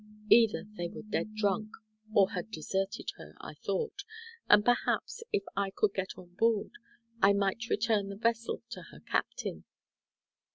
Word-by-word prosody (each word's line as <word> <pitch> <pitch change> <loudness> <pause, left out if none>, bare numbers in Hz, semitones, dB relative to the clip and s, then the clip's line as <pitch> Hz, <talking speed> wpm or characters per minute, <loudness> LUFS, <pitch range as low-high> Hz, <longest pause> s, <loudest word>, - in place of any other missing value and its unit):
Either 225 -3 +6
they 175 - -1
were - - -9
dead 215 0 -2
drunk, 215 0 0 0.4
or 195 -3 +5
had 215 - -4
deserted 195 +1 -2
her, - - -12
I - - -8
thought, 445 -4 -3 0.5
and 210 - +7
perhaps 245 - +1
if 200 - +1
I 200 0 +1
could 200 +1 +1
get 190 -1 -3
on 175 -1 -13
board, 225 -2 +2 0.5
I 200 +1 +7
might 200 +3 0
return 210 -2 +1
the 200 - -5
vessel 230 +2 0
to - - -6
her - - -14
captain. - - -2
205 Hz, 155 wpm, -31 LUFS, 195-225 Hz, 0.5 s, and